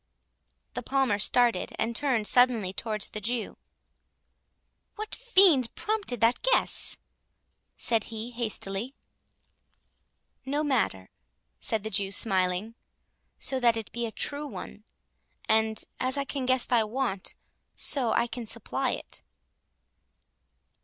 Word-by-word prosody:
The - - -3
Palmer 265 -7 +1
started, 240 +3 +3
and 230 +1 -1
turned 250 -5 +1
suddenly 230 -4 +3
towards 215 -1 -2
the 210 - -6
Jew:—"What 245 - -9
fiend 375 - +4
prompted 415 - -1
that 230 +2 +3
guess?" - - +2 0.8
said 225 -3 +1
he, 225 +1 -6
hastily. 230 0 -2 1.5
"No 285 +3 -1
matter," 220 - 0 0.5
said 220 -2 -2
the 220 - -4
Jew, 195 0 -1
smiling, 190 0 +1 0.6
"so 265 - -1
that 235 -2 +3
it 225 - -6
be 235 0 -2
a - - -7
true 290 +6 -2
one—and, 220 -2 -4 0.2
as 260 +2 0
I 280 - -1
can 270 -2 -4
guess 255 -1 +3
thy 235 -3 +3
want, 215 -3 -3 0.4
so 250 -6 +1
I 235 - +2
can 240 -1 -6
supply - - -1
it." - - -7
235 Hz, 115 wpm, -28 LUFS, 215-265 Hz, 1.5 s, fiend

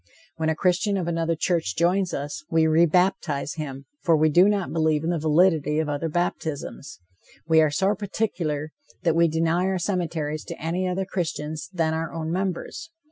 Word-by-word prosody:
When 160 -1 0
a 160 - +1
Christian 185 +4 +1
of 180 -3 -2
another 165 -1 0
church 160 - 0
joins 180 +2 +2
us, 145 +2 -4
we 160 -1 +3
re 160 +2 +4
baptize 160 -4 +1
him, 140 -3 -6 0.2
for 165 -4 +3
we 155 +1 +4
do 180 +6 +6
not 200 -3 -1
believe 155 -2 +1
in 165 - 0
the 170 - -1
validity 155 -1 +3
of 160 -1 0
other 145 +3 -2
baptisms. 155 - -3 0.5
We 160 -1 +5
are 155 - +4
so 190 +7 +1
particular 175 -8 -2 0.3
that 165 -2 +2
we 170 0 +5
deny 165 +3 +1
our 190 0 0
cemeteries 165 -5 -2
to - - -7
any 175 +4 -1
other 185 +1 -1
Christians 160 -5 -4
than 165 -4 0
our 160 0 -3
own 160 -1 -4
members. 190 - -3
165 Hz, 185 wpm, -24 LUFS, 155-180 Hz, 0.5 s, do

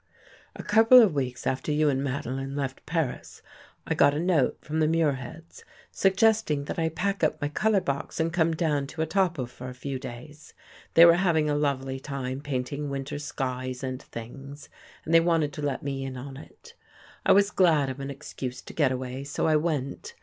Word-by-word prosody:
" - - -25
A - - -7
couple 225 +4 +7
of 215 -8 +5
weeks 130 -3 -3
after 130 +3 -1
you 150 +1 +2
and 135 -1 +1
Madeline 135 0 -3
left 135 -2 -4
Paris, 160 -5 -3 0.4
I - - 0
got 140 +1 +4
a - - -1
note 170 -5 +2
from 155 +1 -4
the 155 - +3
Muirheads, 160 0 -2 0.3
suggesting 195 -6 +2
that 170 - -4
I 160 0 +1
pack 195 +4 -2
up 155 - +1
my 145 - -2
color 210 +6 +2
box 140 +1 -4
and 165 0 0
come 165 -2 +2
down 150 -4 0
to 160 +2 -3
Etaples 160 -7 0
for 125 0 -8
a 125 - -9
few 135 +1 -5
days. 135 +5 -10 0.4
They 170 - +10
were 170 0 +7
having 160 -5 +2
a - - +1
lovely 135 -2 -1
time 135 -1 -5
painting 140 +1 -3
winter 140 +1 -4
skies 130 -3 -4
and 130 0 -4
things 135 +5 -10 0.4
and 160 - -2
they 165 - +8
wanted 165 -3 +1
to 150 - -6
let 145 -3 -2
me 135 -1 -3
in 130 -1 -5
on 135 +2 -8
it. - - -14 0.5
I - - +4
was 200 +1 +4
glad 160 -7 +3
of 130 +1 -5
an 135 0 -5
excuse 135 -2 -7
to - - -11
get 145 -5 +2
away, 130 +1 -4
so 140 0 -2
I 155 - +3
went. 155 - -2
145 Hz, 200 wpm, -27 LUFS, 135-165 Hz, 0.5 s, They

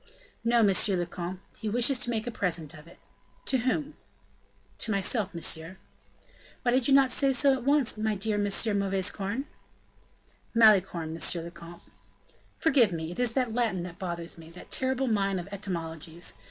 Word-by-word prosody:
"No, 235 0 +4
monsieur 195 0 +4
le 175 -1 -1
comte, 175 +2 -6 0.2
he 220 - -3
wishes 245 +4 +2
to 245 - 0
make 225 -1 -1
a 240 - -3
present 170 -8 -2
of 155 0 -13
it." 170 - -16 0.5
"To 260 - +1
whom?" 280 +5 -1 0.9
"To - - -3
myself, 200 -1 0
monsieur." 165 +2 -1 0.9
"Why 245 - +2
did 255 0 +2
you 275 - +4
not 270 -2 +5
say 275 -1 +3
so 275 +2 +4
at 255 -2 -4
once, 280 -6 +2
my 215 0 0
dear 210 +2 -1
M. 205 - +1
Mauvaisecorne?" 200 +2 0 1.1
"Malicorne, 190 -7 +4
monsieur 165 +1 0
le 170 - -8
comte." 170 0 -12 0.7
"Forgive 265 -10 +4
me; 165 -1 -4
it 175 - -8
is 245 -2 +1
that 250 -3 0
Latin 225 -7 0
that 180 +1 -9
bothers 170 -3 -5
me 160 0 -12
that 170 +2 -13
terrible 260 0 +1
mine 200 -5 +1
of 180 0 -5
etymologies. 170 -4 -4
200 Hz, 170 wpm, -28 LUFS, 175-240 Hz, 1.1 s, not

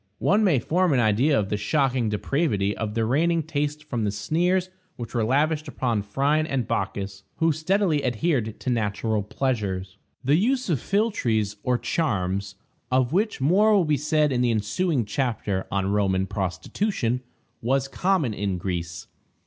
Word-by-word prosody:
One 210 +3 +2
may 180 -9 +4
form 175 +7 +1
an 130 - +3
idea 120 +6 +3
of 100 -2 -2
the 105 - 0
shocking 125 +2 +1
depravity 105 - 0
of 110 -1 -4
the 115 -1 +1
reigning 165 +7 +2
taste 150 0 -2
from 120 -7 -3
the 105 - +1
sneers 175 - 0 0.2
which 115 -2 -7
were 115 -2 +1
lavished 150 +6 +1
upon 120 -6 -1
Phryne 140 +9 +1
and 135 -5 -1
Bacchis, 100 -1 -3
who 165 0 +2
steadily 160 0 +1
adhered 125 -3 0
to 130 - -1
natural 110 -1 0
pleasures. 100 -5 -2 0.2
The 140 +4 +3
use 250 +4 +1
of 145 - +1
philtres, 115 - 0
or 125 -1 +1
charms 100 - -1 0.4
(of 130 +1 +2
which 210 0 +1
more 205 +9 +4
will 190 -4 +3
be 150 -1 +2
said 150 0 +1
in 125 -2 +1
the 125 - +2
ensuing 115 - 0
chapter 105 -4 -2
on 100 0 0
Roman 95 -2 +1
prostitution), 115 - -2 0.4
was 135 +3 +1
common 175 - 0
in 100 -2 -2
Greece. 85 -2 -4
125 Hz, 160 wpm, -25 LUFS, 105-155 Hz, 0.4 s, may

